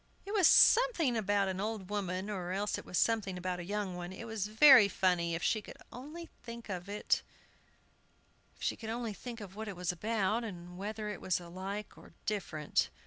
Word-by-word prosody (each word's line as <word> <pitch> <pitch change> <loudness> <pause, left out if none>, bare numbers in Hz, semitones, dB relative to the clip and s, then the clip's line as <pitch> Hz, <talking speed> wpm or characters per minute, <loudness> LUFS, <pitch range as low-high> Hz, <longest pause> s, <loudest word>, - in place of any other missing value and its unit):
It 400 - -6
was 385 -6 +6
something 435 - +6
about 205 -2 +1
an 190 0 -2
old 210 -2 -4
woman, 190 -2 -2
or 185 -4 -4
else 205 +2 -1
it - - -11
was 180 - -3
something 210 -5 +1
about 180 0 -3
a - - -5
young 200 0 -3
one. 175 0 -6
It 210 +5 -8
was 220 -3 -3
very 230 0 +8
funny, 180 -3 +1
if 170 - -4
she 215 - +2
could - - -11
only 305 +7 -8
think 235 -2 -9
what 195 +2 -1 2.4
it 200 - -5
was 180 0 -1
about, 215 +4 0
or 220 -4 -4
whether 190 +5 -6
it 210 - -6
was 185 - 0
alike 190 +4 -6
or - - -16
different. 175 -8 -1
200 Hz, 165 wpm, -33 LUFS, 180-225 Hz, 2.4 s, very